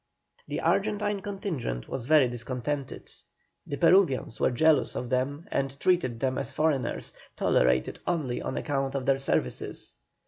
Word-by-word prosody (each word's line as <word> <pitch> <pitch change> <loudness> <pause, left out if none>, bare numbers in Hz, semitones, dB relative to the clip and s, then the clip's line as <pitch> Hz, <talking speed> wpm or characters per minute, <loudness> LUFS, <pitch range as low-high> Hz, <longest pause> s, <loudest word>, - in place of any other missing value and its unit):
The - - -3
Argentine 205 0 +1
contingent 180 - -4
was 125 -2 -4
very 150 -4 +6
discontented; 130 +3 -3 0.6
the 140 - -3
Peruvians 165 - +3
were - - +3
jealous 155 +5 +3
of 125 0 -4
them 140 +5 -1
and 135 0 -2
treated 150 -11 +1
them 130 0 0
as 140 - -4
foreigners, 150 -5 0 0.2
tolerated 65 0 +2
only 145 -8 -1
on - - -3
account 135 -2 -1
of 135 -2 -2
their 135 -1 +3
services. 65 - -2
135 Hz, 140 wpm, -28 LUFS, 125-160 Hz, 0.6 s, very